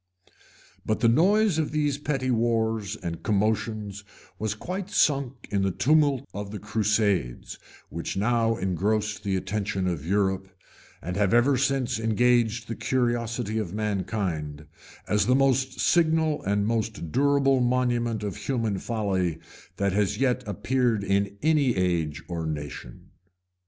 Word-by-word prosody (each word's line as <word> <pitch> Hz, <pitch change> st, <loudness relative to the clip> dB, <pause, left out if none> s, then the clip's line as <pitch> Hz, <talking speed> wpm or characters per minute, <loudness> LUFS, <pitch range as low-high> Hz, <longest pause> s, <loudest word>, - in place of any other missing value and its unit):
But 110 Hz, 0 st, -1 dB
the 120 Hz, -, +5 dB
noise 185 Hz, -, +3 dB
of 155 Hz, -, 0 dB
these 145 Hz, -2 st, 0 dB
petty 135 Hz, -3 st, -1 dB
wars 110 Hz, -3 st, 0 dB
and 85 Hz, -6 st, -6 dB
commotions 105 Hz, -1 st, -1 dB, 0.4 s
was 110 Hz, -1 st, -2 dB
quite 185 Hz, -, -5 dB
sunk 135 Hz, -8 st, +1 dB
in 100 Hz, -1 st, +1 dB
the 95 Hz, -, +2 dB
tumult 140 Hz, -, +2 dB
of 100 Hz, 0 st, -5 dB
the 105 Hz, -, -6 dB
crusades, 105 Hz, -, -1 dB, 0.3 s
which 85 Hz, +3 st, -5 dB
now 115 Hz, +2 st, +2 dB
engrossed 105 Hz, +3 st, -1 dB
the 100 Hz, -2 st, 0 dB
attention 95 Hz, 0 st, -2 dB
of 85 Hz, -5 st, -2 dB
Europe, 95 Hz, +1 st, 0 dB, 0.6 s
and 90 Hz, +3 st, -4 dB
have 105 Hz, +2 st, +2 dB
ever 130 Hz, +4 st, +4 dB
since 130 Hz, -3 st, 0 dB
engaged 115 Hz, 0 st, +2 dB
the 115 Hz, -, -4 dB
curiosity 120 Hz, -3 st, -1 dB
of 100 Hz, -3 st, -4 dB
mankind, 95 Hz, -8 st, -2 dB, 0.4 s
as 105 Hz, +1 st, +2 dB
the 125 Hz, -, +4 dB
most 135 Hz, -1 st, +1 dB
signal 160 Hz, -2 st, +2 dB
and 100 Hz, +1 st, +1 dB
most 110 Hz, -7 st, -2 dB
durable 140 Hz, -, +3 dB
monument 120 Hz, -3 st, 0 dB
of 100 Hz, -4 st, -4 dB
human 115 Hz, -7 st, -1 dB
folly 95 Hz, -8 st, -1 dB, 0.4 s
that 100 Hz, -1 st, 0 dB
has 100 Hz, -1 st, +1 dB
yet 130 Hz, -1 st, +1 dB
appeared 115 Hz, +2 st, 0 dB
in 100 Hz, 0 st, 0 dB
any 150 Hz, -6 st, +3 dB
age 85 Hz, -5 st, -1 dB
or 85 Hz, -2 st, -3 dB
nation. 75 Hz, -2 st, -7 dB
110 Hz, 135 wpm, -26 LUFS, 100-125 Hz, 0.6 s, the